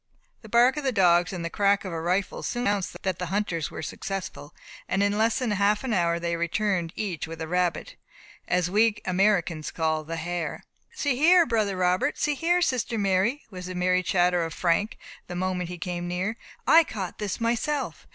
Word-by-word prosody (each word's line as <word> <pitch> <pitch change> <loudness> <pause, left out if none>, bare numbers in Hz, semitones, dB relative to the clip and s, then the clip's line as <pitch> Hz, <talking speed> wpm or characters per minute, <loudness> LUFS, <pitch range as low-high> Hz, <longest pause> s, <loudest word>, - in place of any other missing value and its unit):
The 220 - -13
bark 240 +5 +4
of 300 - -3
the 265 - +1
dogs 175 -4 +4
and 170 -3 -5
crack 200 0 +2
of 185 - -5
a 165 - -3
rifle 185 +3 -1
soon 240 - -2
announced 200 -2 -1
that 190 -2 -1
the 180 - -3
hunters 185 -4 -1
were - - -7
successful, 195 -6 -5 0.4
and 195 - +1
in 205 0 +1
less 220 +1 +2
than 250 -4 -1
half 205 +2 +2
an 255 -4 -1
hour 170 -3 +1
they 170 0 -1
returned 170 0 -1
each 180 -8 -3
with 165 0 -8
a 160 - -4
rabbit, 180 - -1 0.5
as 180 -1 +1
we 210 +3 +3
Americans 180 -4 +1
call 160 -1 -1
the 165 +2 -5
hare. 170 0 -4 0.3
"See 285 -4 -1
here, 340 +4 +6
brother 215 -6 0
Robert! 185 +10 +1
See 295 - +1
here, 345 +5 +2
sister 245 -5 0
Mary!" 200 +7 +1
was 180 -1 -7
the 185 - -6
merry 180 0 +2
chatter 180 -1 +2
of 165 -1 -5
Frank, 180 +5 0 0.3
the 180 - -6
moment 180 -1 -2
he 180 - -6
came 175 0 -4
near. 185 +5 -2 0.3
"I 330 +1 +7
caught 195 - -6
this 210 0 -3
myself. 240 +5 -2
185 Hz, 195 wpm, -26 LUFS, 175-220 Hz, 0.5 s, I